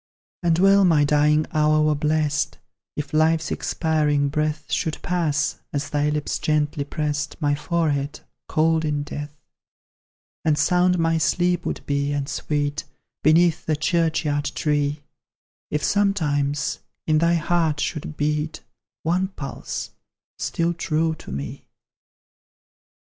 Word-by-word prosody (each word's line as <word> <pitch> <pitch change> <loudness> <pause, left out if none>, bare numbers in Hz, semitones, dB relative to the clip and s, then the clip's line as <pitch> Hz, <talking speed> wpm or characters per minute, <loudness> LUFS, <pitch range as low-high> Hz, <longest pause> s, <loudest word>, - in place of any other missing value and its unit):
And 170 -2 +2
well 195 +2 +5
my 160 -5 +4
dying 150 +1 +3
hour 155 0 +3
were 155 0 +3
blest, 150 0 0 0.4
If 150 0 -5
life's 160 +1 +2
expiring 150 -3 +1
breath 155 +1 -2
Should 160 - -1
pass, 165 -5 0
as 145 +1 -3
thy 145 0 +1
lips 150 0 -2
gently 150 -1 0
prest 150 +1 -3
My 145 -2 +1
forehead 150 -2 -1 0.3
cold 160 +1 +2
in 150 -2 -1
death; 145 0 -7 1.1
And 155 -2 +2
sound 180 +4 +3
my 165 -1 +2
sleep 175 +2 +1
would - - -4
be, 140 0 0
and 140 -1 -2
sweet, 145 -1 -2 0.4
Beneath 165 +1 +4
the 155 - +2
churchyard 155 -2 0
tree, 145 -1 0 0.7
If 150 -1 -1
sometimes 150 -8 +1 0.3
in 155 -1 +3
thy 170 +1 +3
heart 165 -2 +1
should 155 -1 -3
beat 150 +1 -1 0.4
One 180 +4 +1
pulse, 160 -8 -6 0.5
still 170 +1 0
true 160 -1 0
to 155 - -10
me. 70 - -5
155 Hz, 125 wpm, -23 LUFS, 145-165 Hz, 1.1 s, well